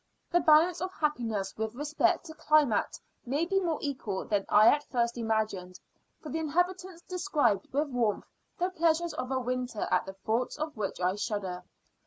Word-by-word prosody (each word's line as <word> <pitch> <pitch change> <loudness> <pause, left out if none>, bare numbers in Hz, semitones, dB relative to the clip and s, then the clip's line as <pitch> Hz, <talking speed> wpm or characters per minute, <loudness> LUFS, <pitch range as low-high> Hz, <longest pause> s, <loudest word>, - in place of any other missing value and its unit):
The 350 - +4
balance 325 +2 +5
of 370 0 -2
happiness 230 - -2
with 220 +1 -3
respect 295 +4 +1
to 320 - -8
climate 305 -7 +2 0.2
may 285 +7 0
be 390 +2 +1
more 335 -5 -1
equal 255 -9 -3
than 205 -2 -1
I 215 +1 +6
at 290 0 +2
first 235 -2 0
imagined; 215 -6 -2 0.4
for 305 - -9
the 320 - -2
inhabitants 355 +3 -1
describe 305 - 0
with 290 +2 0
warmth 235 -5 0 0.3
the 360 +2 0
pleasures 335 -1 +1
of 255 - -4
a 265 -1 0
winter 250 -3 -2
at - - +2
the 195 - -6
thoughts 225 +5 -2
of 305 0 -4
which 210 -3 -3
I 180 +1 +1
shudder. 195 -4 -3
260 Hz, 175 wpm, -29 LUFS, 215-320 Hz, 0.4 s, I